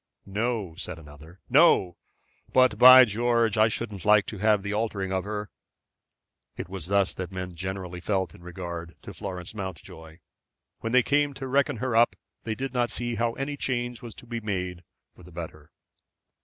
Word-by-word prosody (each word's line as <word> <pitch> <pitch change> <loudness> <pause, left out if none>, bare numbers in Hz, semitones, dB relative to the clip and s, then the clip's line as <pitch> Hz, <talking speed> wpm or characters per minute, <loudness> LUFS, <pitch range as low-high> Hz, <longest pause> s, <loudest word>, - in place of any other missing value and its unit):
"No," 105 -2 -2
said 95 - -6
another, 80 +3 -14
"no. 125 - +4 0.6
But, 130 0 +4
by 130 0 +10
George! 115 0 +1
I 110 0 +5
shouldn't 105 -3 -4
like 105 -1 +5
to 105 - -7
have 105 -1 +3
the 100 +1 -3
altering 105 -3 -2
of 95 0 -1
her." 105 -1 -5 1.1
It - - -5
was 95 -3 -7
thus 100 -1 +2
that 95 0 -6
men 90 -1 -5
generally 90 0 -5
felt 95 -1 -1
in - - -16
regard 85 -1 -7
to 100 - -9
Florence 90 0 -6
Mountjoy. 80 -5 -8 0.6
When 115 - -4
they 125 0 +5
came 145 +1 +1
to 135 - -6
reckon 130 -1 +1
her 125 +1 -2
up 120 +1 +4 0.3
they 110 -1 -2
did 130 +3 -5
not 120 -1 +1
see 120 -1 -3
how 115 0 0
any 140 +3 -4
change 120 -4 -2
was 120 -2 -9
to - - -8
be 115 -1 -4
made 90 -4 -4 0.3
for - - -18
the 90 +1 -14
better. 80 -3 -9
105 Hz, 180 wpm, -26 LUFS, 90-120 Hz, 1.1 s, by